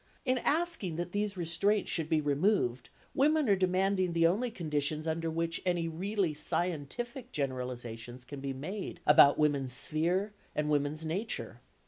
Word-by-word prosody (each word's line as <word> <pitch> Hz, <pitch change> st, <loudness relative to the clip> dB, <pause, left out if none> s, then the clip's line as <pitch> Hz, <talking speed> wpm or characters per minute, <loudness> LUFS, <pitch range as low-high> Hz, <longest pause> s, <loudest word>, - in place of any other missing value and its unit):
In 255 Hz, 0 st, +2 dB
asking 310 Hz, -, 0 dB
that 175 Hz, +2 st, -4 dB
these 205 Hz, 0 st, -1 dB
restraints 185 Hz, +5 st, +1 dB
should 160 Hz, -2 st, -2 dB
be 160 Hz, -2 st, +2 dB
removed, 145 Hz, -, +1 dB, 0.2 s
women 300 Hz, +1 st, +3 dB
are 200 Hz, -, +5 dB
demanding 185 Hz, 0 st, +1 dB
the 165 Hz, 0 st, +3 dB
only 210 Hz, +9 st, +2 dB
conditions 155 Hz, -5 st, -1 dB
under 165 Hz, 0 st, -1 dB
which 165 Hz, +1 st, -2 dB
any 175 Hz, -2 st, 0 dB
really 185 Hz, +1 st, -1 dB
scientific 180 Hz, -, -2 dB
generalisations 125 Hz, -3 st, -5 dB
can 140 Hz, +2 st, -8 dB
be 135 Hz, 0 st, -3 dB
made 175 Hz, +8 st, -5 dB
about 145 Hz, -1 st, +7 dB
woman's 140 Hz, -4 st, +1 dB
sphere 175 Hz, +9 st, +1 dB, 0.2 s
and 150 Hz, 0 st, 0 dB
woman's 150 Hz, +2 st, 0 dB
nature. 195 Hz, +8 st, -4 dB
165 Hz, 145 wpm, -31 LUFS, 145-200 Hz, 0.2 s, about